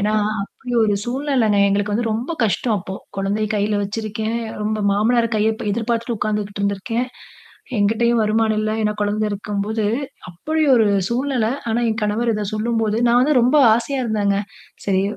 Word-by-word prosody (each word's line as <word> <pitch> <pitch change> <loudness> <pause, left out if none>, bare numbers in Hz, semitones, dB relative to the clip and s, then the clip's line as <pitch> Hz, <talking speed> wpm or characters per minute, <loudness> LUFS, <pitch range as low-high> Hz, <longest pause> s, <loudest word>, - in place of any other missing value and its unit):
ஏன்னா 210 +1 +1 0.3
அப்படி 245 +5 -8
ஒரு 210 -1 +2
சூழ்நிலைங்க. 250 -5 +1
எங்களுக்கு 205 +1 0
வந்து 225 +2 0
ரொம்ப 235 +9 -3
கஷ்டம் 220 +1 0
அப்போ, 190 +1 -7 0.2
குழந்தைய 200 +2 -1
கையில 205 0 +1
வச்சிருக்கேன் 220 +2 -3 0.2
ரொம்ப 215 +1 -1
மாமனார் 230 +3 +2
கைய 215 +1 +2
அப்ப 225 - -7
எதிர்பார்த்துட்டு 230 +1 -1
உக்காந்துகிட்டு 210 -1 -2
இருந்திருக்கேன். 200 +5 -1 0.7
என்கிட்டேயும் 225 +3 +2
வருமானம் 215 0 +1
இல்ல, 215 - -1
ஏன்னா 210 0 +1
குழந்தை 210 +1 0
இருக்கும்போது, 205 +2 -2 0.4
அப்படி 310 - -3
ஒரு 225 -3 +4 0.2
சூழ்நிலை, 245 -2 0 0.2
ஆனா 230 +2 +1
என் 220 0 -1
கணவர் 215 +3 0
இத 210 -1 -2
சொல்லும்போது 220 0 0
நான் 235 +1 +4
வந்து 285 +4 +3
ரொம்ப 255 +6 +3 0.2
ஆசையா 240 +4 -2
இருந்தேங்க. 205 -3 +1 0.5
சரி 190 -1 +1
215 Hz, 155 wpm, -20 LUFS, 205-235 Hz, 0.7 s, ஒரு